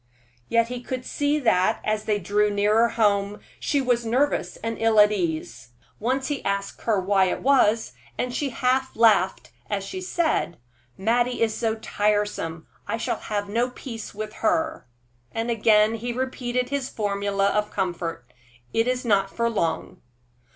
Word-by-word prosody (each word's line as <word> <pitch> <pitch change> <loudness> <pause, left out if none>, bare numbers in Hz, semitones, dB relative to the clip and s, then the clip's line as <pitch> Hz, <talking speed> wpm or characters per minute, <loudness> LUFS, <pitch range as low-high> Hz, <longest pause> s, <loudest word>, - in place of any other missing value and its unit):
Yet 230 0 +2
he 250 -1 -5
could 255 0 -5
see 290 +1 0
that, 185 -7 +2
as 215 0 -1
they 210 -1 +1
drew 205 +2 +1
nearer 210 +3 +3
home, 205 -2 +1 0.2
she 285 - 0
was 245 -2 +1
nervous 235 -5 0
and 225 0 -3
ill 225 -1 +3
at 210 0 +7
ease. 160 -9 -3 0.3
Once 260 +4 0
he 290 -2 -3
asked 200 0 -2
her 220 -4 +2
why 190 0 +3
it 185 - -2
was, 230 - +3 0.2
and 250 0 -2
she 280 +2 -1
half 255 +2 0
laughed 210 -5 +3 0.2
as 200 -2 -1
she 370 - -6
said: 335 - 0 0.4
"Mattie 240 +4 +1
is 220 -1 +1
so 225 -1 0
tiresome; 205 -6 -1 0.2
I 215 +3 -1
shall 230 - -2
have 205 -1 -3
no 235 +5 0
peace 230 -4 -8
with 215 0 -5
her." 320 - 0 0.4
And 225 +1 -2
again 215 -1 +4
he 235 +2 -3
repeated 250 0 -2
his 280 -2 -2
formula 200 -1 0
of 210 +1 0
comfort, 175 -7 -3 0.5
"It 225 +1 +2
is 255 0 -1
not 195 -3 +2
for 235 +3 -1
long." 170 -7 -2
220 Hz, 160 wpm, -24 LUFS, 200-245 Hz, 0.5 s, at